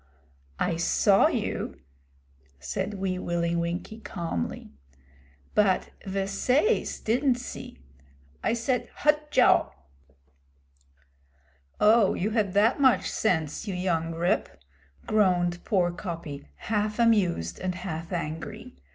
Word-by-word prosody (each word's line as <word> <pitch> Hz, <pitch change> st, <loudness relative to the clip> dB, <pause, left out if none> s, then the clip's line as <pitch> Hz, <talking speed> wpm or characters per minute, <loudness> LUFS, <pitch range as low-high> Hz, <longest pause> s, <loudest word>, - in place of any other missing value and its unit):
'I 170 Hz, -2 st, 0 dB
saw 195 Hz, +4 st, +4 dB
you,' -, -, -3 dB, 0.8 s
said 75 Hz, -, -3 dB
Wee 190 Hz, -1 st, -2 dB
Willie 170 Hz, -1 st, -1 dB
Winkie 170 Hz, +6 st, -3 dB
calmly. 170 Hz, -, -4 dB, 0.8 s
'But 200 Hz, -3 st, +2 dB, 0.2 s
ve 195 Hz, 0 st, -1 dB
sais 255 Hz, -, +1 dB
didn't 250 Hz, +3 st, +2 dB
see. 250 Hz, 0 st, -8 dB, 0.7 s
I -, -, +2 dB
said, 240 Hz, +2 st, -1 dB
"Hut 300 Hz, 0 st, +1 dB
jao!"' -, -, +4 dB, 2.1 s
'Oh, 215 Hz, -1 st, +5 dB
you 205 Hz, +4 st, -1 dB
had 210 Hz, -4 st, 0 dB
that 225 Hz, +7 st, +3 dB
much 260 Hz, -3 st, +4 dB
sense, 160 Hz, -2 st, -1 dB
you 195 Hz, -, -2 dB
young 165 Hz, -3 st, -1 dB
Rip,' 170 Hz, +2 st, +1 dB, 0.6 s
groaned 180 Hz, -5 st, +2 dB
poor 180 Hz, -5 st, +1 dB
Coppy, 170 Hz, -, -7 dB
half 210 Hz, -, -2 dB
amused 190 Hz, -, +2 dB
and 185 Hz, -1 st, -2 dB
half 170 Hz, -2 st, -6 dB
angry. 165 Hz, -3 st, -5 dB
190 Hz, 110 wpm, -27 LUFS, 170-220 Hz, 2.1 s, Oh